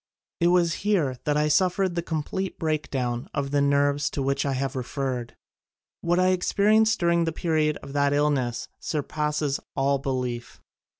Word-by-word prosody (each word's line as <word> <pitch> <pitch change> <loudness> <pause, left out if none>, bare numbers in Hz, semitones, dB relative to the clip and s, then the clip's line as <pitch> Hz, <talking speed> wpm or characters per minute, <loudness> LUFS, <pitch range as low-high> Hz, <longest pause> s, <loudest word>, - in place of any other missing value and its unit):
It 170 - +3
was 175 -1 +3
here 165 -12 +1
that 150 0 +1
I 150 0 +2
suffered 185 +4 +2
the 170 - -1
complete 170 +4 -3
breakdown 135 -6 -2
of 140 -2 -2
the 145 0 +2
nerves 140 0 +2
to 140 - 0
which 140 +1 0
I 140 - 0
have 135 0 -2
referred. 130 -1 -3 0.7
What 175 +1 +1
I 185 0 +4
experienced 215 +4 +3
during 170 -1 +2
the 165 - 0
period 155 -2 0
of 140 - -9
that 140 -1 +2
illness 145 -5 0
surpasses 150 -1 -1 0.2
all 140 0 +2
belief. 125 -3 -3
150 Hz, 160 wpm, -25 LUFS, 135-170 Hz, 0.7 s, I